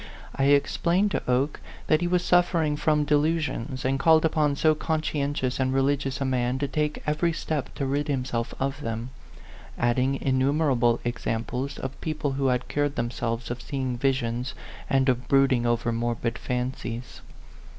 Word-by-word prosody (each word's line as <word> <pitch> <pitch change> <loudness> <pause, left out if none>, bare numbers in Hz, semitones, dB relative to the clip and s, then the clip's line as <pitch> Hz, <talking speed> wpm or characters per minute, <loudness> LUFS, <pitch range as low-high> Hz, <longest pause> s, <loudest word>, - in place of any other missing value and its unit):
I 135 - +1
explained 170 +7 +3
to - - 0
Oke 130 +4 +1 0.3
that 155 +1 +3
he 175 - +1
was 180 0 +1
suffering 170 -4 +3
from 150 0 +2
delusions, 150 -4 0
and 135 +1 +1
called 160 +2 +5
upon 150 -2 +2
so 155 +2 +4
conscientious 145 -4 -1
and 130 0 +1
religious 135 0 0
a 135 - -1
man 125 -1 0
to 140 +1 -1
take 150 +1 -2
every 155 +3 +1
step 155 -3 -3
to 140 - -2
rid 145 +3 -1
himself 125 -4 -2
of 135 +2 -2
them, 115 0 -4 0.7
adding 125 +3 +1
innumerable 130 -3 +2
examples 120 +3 -3
of 130 +1 -6
people 155 -3 -2
who 135 0 0
had 125 -1 0
cured 145 -1 -1
themselves 120 0 -2
of 120 0 -4
seeing 130 -3 -3
visions 125 -1 -1 0.3
and 135 0 +3
of 125 -1 +1
brooding 135 -3 +3
over 120 0 +1
morbid 115 0 -1
fancies. 125 -1 -4
135 Hz, 155 wpm, -26 LUFS, 125-150 Hz, 0.7 s, called